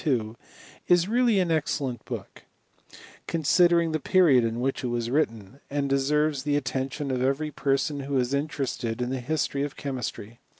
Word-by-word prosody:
— -, -, -23 dB, 0.3 s
is 175 Hz, 0 st, +4 dB
really 235 Hz, -2 st, +3 dB
an 180 Hz, -3 st, +1 dB
ex 155 Hz, -2 st, +1 dB
^ -, -, -8 dB
cellent 125 Hz, -5 st, -4 dB
book, -, -, -8 dB, 0.8 s
considering 170 Hz, +1 st, +3 dB
the 155 Hz, -, -1 dB
period 150 Hz, -7 st, +4 dB
in 115 Hz, +1 st, -1 dB
which 135 Hz, +2 st, -1 dB
it -, -, -1 dB
was 120 Hz, -1 st, -2 dB
written, 125 Hz, -4 st, -1 dB
and 140 Hz, 0 st, -1 dB
deserves 145 Hz, +1 st, +1 dB
the 145 Hz, +1 st, 0 dB
attention 135 Hz, +1 st, -3 dB
of 125 Hz, -1 st, -1 dB
every 140 Hz, +4 st, 0 dB
person 140 Hz, +1 st, 0 dB
who 140 Hz, 0 st, -2 dB
is 125 Hz, +1 st, 0 dB
interested 135 Hz, -5 st, -2 dB
in 125 Hz, +1 st, -2 dB
the 130 Hz, -, -2 dB
history 145 Hz, 0 st, -1 dB
of 145 Hz, -1 st, -3 dB
chemistry. 125 Hz, -4 st, -5 dB
140 Hz, 175 wpm, -26 LUFS, 130-155 Hz, 0.8 s, is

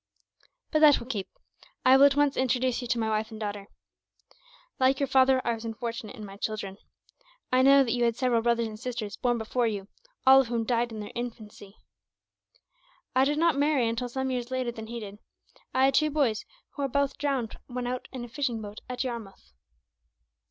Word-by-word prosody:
"But 310 Hz, -, +3 dB
that 300 Hz, -2 st, +7 dB
will -, -, -8 dB
keep. 215 Hz, -7 st, -4 dB, 0.6 s
I 260 Hz, +1 st, +8 dB
will 275 Hz, +1 st, +8 dB
at 280 Hz, -, 0 dB
once 290 Hz, -1 st, +2 dB
introduce 255 Hz, -1 st, +1 dB
you 245 Hz, -, -5 dB
to 235 Hz, -, 0 dB
my 225 Hz, -1 st, 0 dB
wife 215 Hz, 0 st, -1 dB
and 220 Hz, -, -9 dB
daughter. 205 Hz, -2 st, -5 dB, 1.1 s
Like 265 Hz, +1 st, +3 dB
your 280 Hz, -, +2 dB
father, 265 Hz, -1 st, +4 dB
I 235 Hz, -, +1 dB
was 225 Hz, 0 st, -7 dB
unfortunate 230 Hz, 0 st, -5 dB
in 215 Hz, -4 st, -8 dB
my 195 Hz, 0 st, -10 dB
children. 200 Hz, -2 st, -4 dB, 0.7 s
I 255 Hz, 0 st, +4 dB
know 275 Hz, +1 st, +7 dB
that 235 Hz, -, -2 dB
you 240 Hz, 0 st, +1 dB
had 235 Hz, -1 st, +2 dB
several 245 Hz, -2 st, +1 dB
brothers 235 Hz, 0 st, +1 dB
and 215 Hz, -1 st, -7 dB
sisters 230 Hz, -5 st, -4 dB
born 240 Hz, -1 st, 0 dB
before 235 Hz, +2 st, 0 dB
you, 200 Hz, -2 st, -4 dB, 0.4 s
all 265 Hz, +1 st, +8 dB
of 260 Hz, -, -4 dB
whom 230 Hz, -1 st, -1 dB
died 235 Hz, 0 st, 0 dB
in 215 Hz, -1 st, -6 dB
their 205 Hz, -, -7 dB
infancy. 220 Hz, -4 st, -7 dB, 1.4 s
I 260 Hz, +1 st, +5 dB
did 295 Hz, +2 st, 0 dB
not 325 Hz, -3 st, +2 dB
marry 285 Hz, -5 st, +2 dB
until 235 Hz, +2 st, -2 dB
some 265 Hz, +1 st, -2 dB
years 245 Hz, -1 st, -3 dB
later 255 Hz, -2 st, -2 dB
than 220 Hz, -2 st, -8 dB
he 235 Hz, +1 st, -5 dB
did. 205 Hz, -1 st, -9 dB, 0.5 s
I 260 Hz, +1 st, +3 dB
had 270 Hz, -, +3 dB
two 305 Hz, 0 st, +3 dB
boys, 275 Hz, -8 st, 0 dB, 0.3 s
who 285 Hz, -, -7 dB
were 275 Hz, -, +1 dB
both 280 Hz, +1 st, -1 dB
drowned 270 Hz, -6 st, -1 dB
when 250 Hz, -1 st, -4 dB
out 250 Hz, +1 st, -4 dB
in 255 Hz, -3 st, -6 dB
a -, -, -10 dB
fishing 240 Hz, -2 st, -2 dB
boat 210 Hz, 0 st, -8 dB
at 250 Hz, +1 st, -2 dB
Yarmouth. 230 Hz, -, -7 dB
240 Hz, 205 wpm, -28 LUFS, 220-265 Hz, 1.4 s, I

